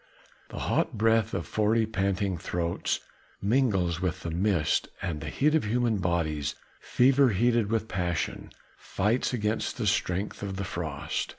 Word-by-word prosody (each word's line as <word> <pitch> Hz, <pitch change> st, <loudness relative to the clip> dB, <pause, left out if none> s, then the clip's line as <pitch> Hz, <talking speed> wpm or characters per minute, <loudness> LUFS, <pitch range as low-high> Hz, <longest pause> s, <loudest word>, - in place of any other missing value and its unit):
The -, -, -8 dB
hot -, -, 0 dB
breath 110 Hz, 0 st, +3 dB
of 85 Hz, -, -2 dB
forty 110 Hz, +1 st, +2 dB
panting 100 Hz, -2 st, 0 dB
throats 85 Hz, -1 st, -2 dB, 0.4 s
mingles 100 Hz, -7 st, +1 dB
with 90 Hz, 0 st, -1 dB
the 85 Hz, -, -4 dB
mist, 90 Hz, -2 st, +1 dB
and 80 Hz, -5 st, -3 dB
the 80 Hz, -, -4 dB
heat 150 Hz, +2 st, +2 dB
of 160 Hz, -, +3 dB
human 115 Hz, -1 st, +1 dB
bodies 80 Hz, -6 st, -1 dB, 0.2 s
fever 135 Hz, +1 st, +4 dB
heated 115 Hz, +1 st, +2 dB
with 110 Hz, -1 st, 0 dB
passion, 90 Hz, -4 st, -2 dB, 0.3 s
fights 105 Hz, +6 st, 0 dB
against 110 Hz, -3 st, -1 dB
the 115 Hz, -, -2 dB
strength 100 Hz, -1 st, 0 dB
of 100 Hz, -1 st, -4 dB
the 100 Hz, -, -3 dB
frost. 80 Hz, -5 st, -3 dB
100 Hz, 150 wpm, -28 LUFS, 90-115 Hz, 0.4 s, fever